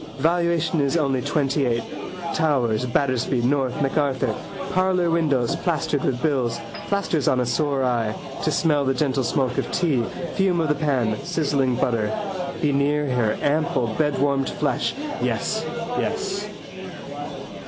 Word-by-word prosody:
Valuation 170 -1 +2
is 140 +4 +2
only 135 -5 +1
twentyeight. 135 -5 +1 0.5
Towers, 125 -7 +1
Battersby, 130 0 +1
North, 135 +2 +1
MacArthur: 135 -1 +1 0.4
parlour 185 -2 +2
windows 145 -8 +2
plastered 155 -4 0
with 125 -2 0
bills. 130 -7 +1 0.3
Plasters 195 -7 0
on 130 - +3
a 125 - +1
sore 140 +2 +1
eye. 115 -4 +1 0.3
To - - +2
smell 150 -4 +2
the 135 -1 +1
gentle 135 -1 +1
smoke 125 0 0
of - - -3
tea, 155 -9 +2 0.3
fume 190 -3 +2
of 160 -2 +1
the - - +4
pan, 130 -8 0
sizzling 145 -7 +1
butter. 115 -4 +1 0.5
Be 145 -2 +3
near 145 0 +1
her 120 -4 +1
ample 145 -6 +1
bedwarmed 140 -2 +1
flesh. - - -1 0.3
Yes, - - 0 0.4
yes. - - -2
140 Hz, 130 wpm, -23 LUFS, 125-155 Hz, 0.5 s, the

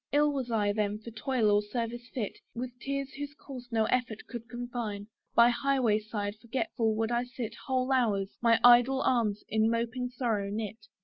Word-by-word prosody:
Ill 295 0 +3
was 260 -3 -3
I 210 -3 +1
then 210 -1 0
for 220 +2 -10
toil 225 0 +1
or 205 0 +4
service 235 +3 -4
fit: 225 -7 -4 0.2
With 245 +1 -4
tears 275 +1 -3
whose 290 +1 -6
course 255 -4 -9
no 220 -1 +2
effort 235 -3 -1
could 235 0 -8
confine, 240 -4 -4 0.3
By 235 +1 +7
high 275 +2 +1
way 220 -4 +3
side 210 -1 -4
forgetful 230 -2 -1
would 225 +1 0
I 240 0 +1
sit 245 -3 -6
Whole 260 0 +1
hours, 210 -7 +1
my 230 -1 +5
idle 245 +2 +7
arms 220 -5 +1
in 220 0 +2
moping 235 +2 -1
sorrow 230 -5 -1
knit. 215 +1 -5
235 Hz, 185 wpm, -30 LUFS, 215-255 Hz, 0.3 s, By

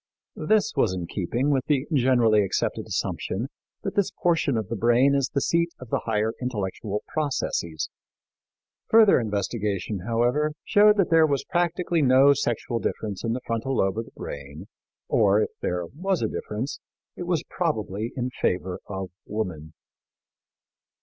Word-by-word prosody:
This 215 0 +3
was 110 -9 +2
in 90 -2 -4
keeping 115 +11 -1
with 135 -2 +1
the 140 -2 +2
generally 120 -6 +4
accepted 95 - -1
assumption 115 +8 -2 0.3
that 195 - -3
this 200 -2 +2
portion 165 -7 +1
of 110 -3 -2
the 115 - -3
brain 120 +6 +4
is 140 -2 +1
the 140 - -1
seat 170 +3 +2
of 125 - -10
the - - +2
higher 110 0 0
intellectual 105 -3 -3
processes. 125 - -2 1.0
Further 220 -6 +6
investigation, 105 -2 -2
however, 120 +6 +1
showed 210 +1 +5
that 195 -4 +2
there 160 -1 +6
was 140 -2 0
practically 175 -1 0
no 135 +1 +6
sexual 120 -3 -1
difference 105 -3 -3
in 115 -1 0
the 125 - -3
frontal 115 +3 -2
lobe 95 0 +1
of 115 - -3
the - - -16
brain, 70 +5 -7 0.4
or, 105 -1 +4
if - - -1
there 90 -1 -1
was 180 - -2
a - - +2
difference, 110 +6 -4 0.4
it 175 - -6
was 175 -4 0
probably 110 - -2
in 125 0 -2
favor 90 -5 -1
of 95 -2 -5 0.2
woman. 90 -8 -4
120 Hz, 155 wpm, -25 LUFS, 105-145 Hz, 1.0 s, Further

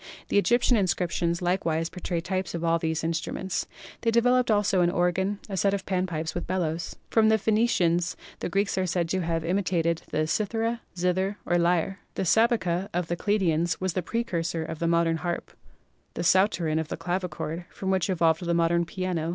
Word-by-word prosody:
The - - +4
Egyptian 240 +3 +3
inscriptions 175 -2 0
likewise 165 -3 0
portray 175 -2 -3
types 185 0 -3
of 170 - -4
all 165 0 +2
these 160 -1 -1
instruments. 165 +3 -2 0.3
They 230 - +1
developed 245 +2 +3
also 205 -3 +3
an 175 - +4
organ, 185 +3 0
a 200 - -4
set 195 +2 +2
of 190 - -5
pan 185 -1 0
pipes 160 -2 -3
with 175 - -4
bellows. 170 -3 -2 0.2
From 220 -1 +4
the 220 - +5
Phenicians 195 -6 +2 0.2
the - - -3
Greeks 195 +1 0
are 185 - 0
said 170 -1 0
to 190 - 0
have 165 -1 -1
imitated 170 -3 0
the 155 - 0
cithara, 225 +6 -1 0.2
zither 185 +3 0
or 175 - +2
lyre. 175 +3 +1 0.2
The 190 - -1
Sabeca 195 -3 +2
of 175 -2 -1
the 175 - 0
Chaldeans 175 -4 +1
was 185 -2 -1
the 185 - 0
precursor 170 -6 -2
of 160 - -6
the 170 - 0
modern 170 -1 +2
harp, 170 +2 -4 0.6
the - - -2
Psauterin 175 -3 +3
of 160 - -3
the - - -5
clavichord, 175 -1 -3
from 190 -1 -3
which 190 0 +1
evolved 165 -2 +2
the 170 0 0
modern 170 0 +2
piano. 175 -2 -2
180 Hz, 185 wpm, -27 LUFS, 165-195 Hz, 0.6 s, the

